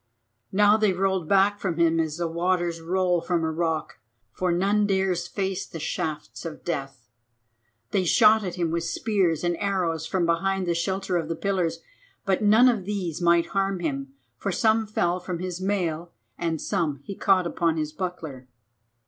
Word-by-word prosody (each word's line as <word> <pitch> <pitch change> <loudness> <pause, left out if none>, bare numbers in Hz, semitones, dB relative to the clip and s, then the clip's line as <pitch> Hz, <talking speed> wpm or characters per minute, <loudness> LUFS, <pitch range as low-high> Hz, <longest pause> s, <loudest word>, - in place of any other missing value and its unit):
Now 205 +2 +5
they 215 -3 +2
rolled 190 -2 0
back 200 +1 +4
from 170 -4 -2
him 165 -1 +3
as 160 -1 -1
the 170 -1 -1
waters 170 0 -1
roll 180 0 +1
from 170 -2 -1
a 160 - 0
rock, 160 -4 -2 0.3
for 180 +8 -1
none 200 +4 +2
dares 190 -3 0
face 190 0 -2
the 165 - -8
shafts 155 0 -4
of 165 -3 -7
death. 135 -7 -4 0.8
They 190 - +2
shot 215 +4 +5
at 180 -2 -4
him 170 -3 -1
with 170 0 -1
spears 185 -4 0
and 175 0 +1
arrows 175 -5 -1
from 175 +1 0
behind 190 +3 0
the 175 - +1
shelter 190 +2 -1
of 165 -2 -2
the 165 - -2
pillars, 170 -3 -1 0.4
but 195 0 +1
none 215 +4 +6
of 225 -7 +1
these 185 -5 -3
might 170 -1 +3
harm 195 -1 0
him, 140 -4 -4 0.2
for 200 - -2
some 220 +3 +2
fell 180 -4 0
from 180 -1 -4
his 180 0 -5
mail 175 -4 -1 0.2
and 165 +1 -2
some 155 -8 -1
he 200 - -6
caught 190 -3 +3
upon 170 -1 0
his 155 -1 -2
buckler. 155 -7 -6
175 Hz, 175 wpm, -25 LUFS, 165-195 Hz, 0.8 s, none